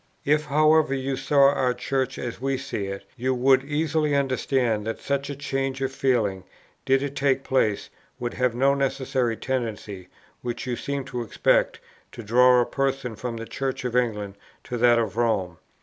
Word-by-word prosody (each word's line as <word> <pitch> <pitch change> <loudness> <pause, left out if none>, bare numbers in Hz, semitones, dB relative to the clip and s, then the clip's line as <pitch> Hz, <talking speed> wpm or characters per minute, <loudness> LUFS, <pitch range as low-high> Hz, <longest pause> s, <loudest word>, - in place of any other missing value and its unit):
"If, 150 +1 +2
however, 155 -1 +3
you 135 0 -2
saw 140 +1 +4
our 125 -3 +1
Church 130 +1 -2
as 120 -1 -5
we 135 0 0
see 100 -5 -4
it, 100 0 -6
you 130 +1 -1
would 130 +1 +4
easily 150 0 0
understand 130 -5 0
that 115 - -3
such 140 0 -2
a 140 - -4
change 135 -1 -2
of 135 0 -1
feeling, 120 -9 0 0.4
did 135 +1 +3
it 140 0 -4
take 135 -1 +1
place, 110 -6 0 0.3
would 120 -1 -3
have 125 -2 0
no 135 +3 +3
necessary 130 -4 -1
tendency, 110 -7 -4 0.3
which 120 -1 -4
you 125 -1 -2
seem 140 +1 -4
to 125 -3 -4
expect, 115 - +1 0.3
to 120 - -8
draw 125 +3 +5
a - - +1
person 135 -3 -2
from 120 +1 -5
the 115 - -6
Church 135 +1 -4
of 125 -1 -2
England 105 -5 -1 0.3
to 125 - -4
that 120 0 +5
of 110 -3 -1
Rome. 100 -7 0
130 Hz, 180 wpm, -25 LUFS, 120-135 Hz, 0.4 s, draw